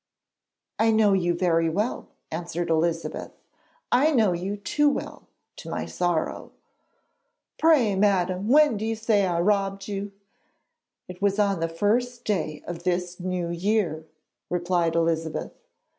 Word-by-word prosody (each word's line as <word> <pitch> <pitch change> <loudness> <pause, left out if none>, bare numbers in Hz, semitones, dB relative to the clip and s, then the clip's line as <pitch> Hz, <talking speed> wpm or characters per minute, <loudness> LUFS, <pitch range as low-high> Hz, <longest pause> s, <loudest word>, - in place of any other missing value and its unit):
'I 225 0 +4
know 215 -2 +4
you 175 -2 +1
very 165 -2 +2
well,' 210 +9 -2 0.2
answered 170 +1 -3
Elizabeth; 165 +1 -1 0.6
'I 290 +6 +4
know 220 -8 +3
you 190 +4 -3
too 290 +9 +2
well, 280 - -5 0.3
to - - -9
my - - -3
sorrow.' 175 -3 -2 1.1
'Pray, 295 -10 +4
madam, 190 -1 +1
when 290 -2 +5
do 215 - -3
you 225 - -1
say 215 -3 +2
I 170 -2 0
robbed 195 +1 0
you?' 200 0 -4 1.0
'It 180 +1 -10
was 200 0 +2
on 200 -3 +2
the 165 0 -1
first 240 +8 0
day 160 -7 -2
of 175 -1 -6
this 180 0 -2
New 180 -1 -2
Year,' 170 -3 -1 0.4
replied 175 -1 0
Elizabeth. 165 -1 -1
185 Hz, 135 wpm, -25 LUFS, 170-210 Hz, 1.1 s, when